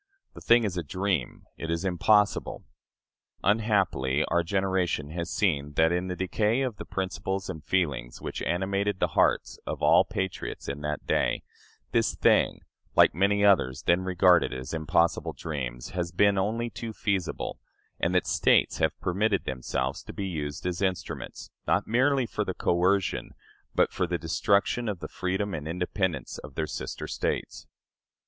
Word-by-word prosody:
The - - -11
thing 120 0 +5
is 95 -4 -2
a 85 - -1
dream 90 -3 -2
it 80 - -5
is 85 +3 -1
impossible." 100 +3 +2 0.8
Unhappily, 95 - +2
our 85 +1 +3
generation 90 -4 0
has 85 +1 -4
seen 75 -9 0
that, 80 +2 +3
in 90 +1 0
the 90 - -3
decay 105 +6 +1
of 125 -6 -2
the - - -7
principles 95 0 -3
and 80 -2 -9
feelings 70 -10 -1
which - - -5
animated 95 +2 0
the - - +1
hearts - - +1
of - - -4
all - - +6
patriots 95 -1 -4
in 70 +1 -4
that 75 0 -3
day, - - +1 0.5
this - - +1
thing, - - +3 0.3
like - - +6
many 100 +3 +2
others 65 -11 +3
then 85 +2 +3
regarded 90 -1 +4
as 65 +2 -6
impossible 80 +1 +1
dreams, 65 -6 -5
has 85 -1 -2
been 100 +3 +4
only 115 +5 -1
too 110 +3 -6
feasible, 100 -4 -2 0.4
and 90 +2 0
that 90 - +3
States - - +3
have - - +1
permitted 100 +2 +1
themselves 65 +1 -2
to - - -10
be 100 - -4
used 75 -4 -4
as 90 0 -2
instruments, 95 -2 -3 0.2
not - - +2
merely 130 +3 +2
for 105 -1 -2
the 95 -2 -4
coercion, 95 +2 +1 0.4
but - - +3
for 90 - 0
the 85 0 -1
destruction 100 +7 +1
of 100 - -2
the 75 - -6
freedom 95 +4 -2
and 75 -2 -4
independence 90 +1 -2
of 70 -3 -11
their 80 - -1
sister 65 -3 -5
States. - - -3
90 Hz, 160 wpm, -27 LUFS, 80-100 Hz, 0.8 s, all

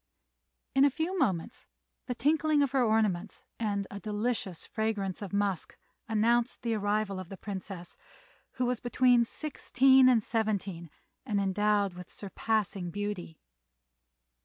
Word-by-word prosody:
In 270 - +5
a 285 - +6
few 320 +7 -2
moments 215 - -1 0.4
the 250 - -2
tinkling 300 +3 +3
of 275 - 0
her 270 -2 +3
ornaments 215 -4 0 0.2
and 205 -3 -1
a 200 - -6
delicious 210 -4 -2
fragrance 215 -4 -2
of 200 - -6
musk 200 -3 -1 0.3
announced 230 +3 +1
the 230 -1 0
arrival 205 -2 0
of 185 -2 -8
the 195 - -8
Princess, 190 -3 -7 0.6
who 255 - -1
was 245 -1 0
between 245 -1 +4
sixteen 265 -1 +4
and 235 -4 +4
seventeen 200 -7 -2 0.3
and 210 -6 -1
endowed 200 0 +1
with 180 0 -10
surpassing 200 -2 -2
beauty. 200 -4 -4
215 Hz, 135 wpm, -30 LUFS, 195-245 Hz, 0.6 s, a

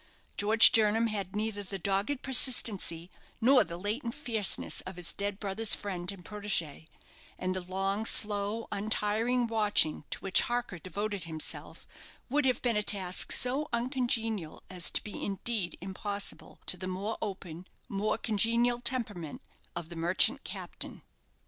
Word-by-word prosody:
George 215 +2 +7
Jernam 225 +1 +3
had 200 -3 -4
neither 210 -1 -2
the 195 0 -6
dogged 200 +9 -1
persistency 215 -10 +3 0.3
nor 255 +3 +5
the 170 0 -7
latent 230 +6 -4
fierceness 230 -9 -1
of 185 0 -8
his 175 -1 -2
dead 200 0 -3
brother's 210 +2 +3
friend 180 -3 -5
and 185 -3 -12
protégé; 200 -8 -3 0.5
and 185 0 -2
the 185 - -2
long, 195 +3 -2
slow, 210 +1 +1
untiring 215 +4 0
watching 210 -9 +2
to - - -3
which 190 -1 +5
Harker 240 -7 -3
devoted 200 +2 -4
himself 160 -2 -5 0.4
would 290 0 +2
have 255 -1 +1
been 240 -3 +1
a - - +2
task 190 -3 +2
so 265 +4 +3
uncongenial 235 - -1
as 180 -2 +1
to - - +3
be 210 - -7
indeed 200 -1 -2
impossible 200 +2 -4
to 180 - +1
the 185 +1 -6
more 195 +4 -4
open, 185 -4 -6 0.2
more 210 +2 -1
congenial 235 +2 +1
temperament 210 - +1 0.4
of 170 -2 -5
the 170 - -9
merchant 185 - +2
captain. - - -7
205 Hz, 145 wpm, -30 LUFS, 185-230 Hz, 0.5 s, George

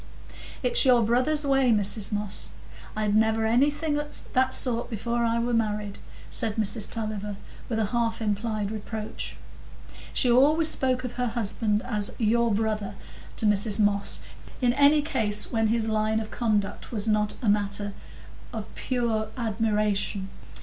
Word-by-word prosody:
"It's 250 - +6
your 245 -3 +5
brother's 255 +7 +2
way, 270 -3 +3
Mrs 210 0 +1
Moss; 205 -1 -3 0.5
I'd 210 -1 +1
never 220 0 +2
anything 290 +6 +2
o' 295 - -4 0.3
that 260 0 +3
sort 240 -2 -1
before 235 +1 -2
I 230 0 +1
was 235 +1 0
married," 210 -2 -2 0.3
said 220 -2 0
Mrs 215 -1 -1
Tulliver, 215 -2 -4 0.3
with 225 - -1
a 220 - +1
half 230 -1 0
implied 210 -1 -2
reproach. 215 0 -6 0.8
She 250 - +2
always 305 +6 +5
spoke 255 -3 +1
of 250 - -4
her 250 0 -1
husband 215 -1 0
as 210 -4 -2
"your 235 +1 +2
brother" 210 -1 -1 0.4
to - - +2
Mrs 210 +1 +3
Moss 205 -1 +2 0.4
in 245 -2 +2
any 285 +2 +5
case 215 -8 0
when 225 -1 +1
his 225 0 0
line 220 0 +1
of 220 0 -6
conduct 210 -4 -1
was 220 -2 -2
not 210 -1 +1
matter 205 0 +1 0.6
of 220 -3 -7
pure 235 -4 -1
admiration. 210 -3 -1
220 Hz, 145 wpm, -26 LUFS, 210-240 Hz, 0.8 s, It's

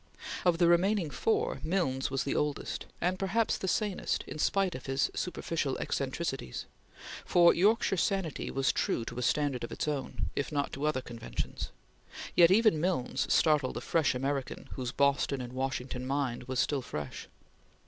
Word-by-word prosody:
Of 175 -2 +4
the 170 0 +4
remaining 175 -1 +3
four, 450 +2 0
Milnes 155 -7 0
was 135 -1 -1
the 140 - -1
oldest, 150 -1 -2
and 185 +1 0
perhaps 210 +4 +1
the 190 - -4
sanest 200 +1 0
in - - -7
spite 195 +2 +2
of 130 - -8
his 135 0 +1
superficial 165 -6 -2
eccentricities, 135 - -3 0.6
for 175 -1 +6
Yorkshire 205 +1 +3
sanity 185 -4 -1
was 135 0 +1
true 115 - -1
to 125 - -5
a - - -2
standard 135 -1 +1
of 120 - -5
its - - -3
own, 130 - -3
if 140 - -2
not 145 -1 -1
to 140 +2 -2
other 150 -4 0
conventions; 115 -2 -5 0.7
yet 170 -1 +8
even 200 -5 +4
Milnes 170 -8 0
startled 150 -4 +3
a - - -5
young 165 -3 +4
American 135 0 -3
whose 125 -2 -4
Boston 140 0 +2
and 125 0 -6
Washington 130 -1 -3
mind 135 -3 -1
was 130 0 -2
still 140 +1 +1
fresh. 75 - -6
145 Hz, 165 wpm, -31 LUFS, 130-180 Hz, 0.7 s, yet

